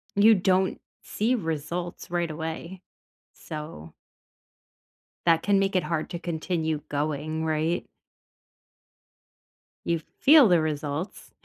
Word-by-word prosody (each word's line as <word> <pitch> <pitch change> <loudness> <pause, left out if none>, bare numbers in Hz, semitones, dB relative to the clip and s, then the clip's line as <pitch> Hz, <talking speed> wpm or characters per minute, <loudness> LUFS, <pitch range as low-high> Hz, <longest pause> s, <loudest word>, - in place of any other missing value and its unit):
you 215 +2 +7
don't 190 0 +1 0.2
see 230 +5 0
results 170 - -4
right 175 -1 0
away, 160 +3 -6 0.5
so 150 - -8 1.3
that 165 -1 +4
can 200 -1 +3
make 195 0 +1
it 185 - +3
hard 155 0 -2
to 170 - -5
continue 160 -2 -2
going, 150 +2 -2
right? 160 +2 0 2.0
You 170 -1 +1 0.2
feel 290 -4 +7
the 175 -3 +5
results 155 +2 -4
165 Hz, 105 wpm, -26 LUFS, 155-185 Hz, 2.0 s, you